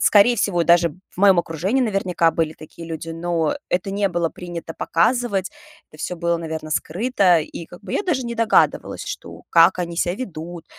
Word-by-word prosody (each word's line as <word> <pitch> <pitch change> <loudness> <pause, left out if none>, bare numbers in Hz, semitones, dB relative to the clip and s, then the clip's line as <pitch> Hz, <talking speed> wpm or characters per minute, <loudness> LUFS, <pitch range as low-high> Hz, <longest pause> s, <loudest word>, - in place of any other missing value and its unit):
скорее 210 +4 +5
всего, 175 -7 +1
даже 170 0 +4 0.2
в - - -24
моем 195 -1 +5
окружении, 175 - 0
наверняка, 190 -7 +1
были 160 -1 -1
такие 165 +2 -11
люди, 165 0 -5
но 165 -1 -1
это 185 +2 -1
не 200 0 +1
было 170 -2 -1
принято 170 -2 -7
показывать. 205 +1 +1 0.4
Это 155 - -15
всё 180 - -3
было, 170 0 0
наверно, 160 -1 -5
скрыто. 185 0 +2
И 160 +1 -6
как 175 - -14
бы - - -7
я - - 0
даже 300 -10 -1
не 235 0 -4
догадывалась, 230 0 +2
что - - -7
как 170 +2 +5
они 170 -1 -3
ся 175 0 +1
ведут, 175 -7 -7
175 Hz, 185 wpm, -21 LUFS, 165-200 Hz, 0.4 s, скорее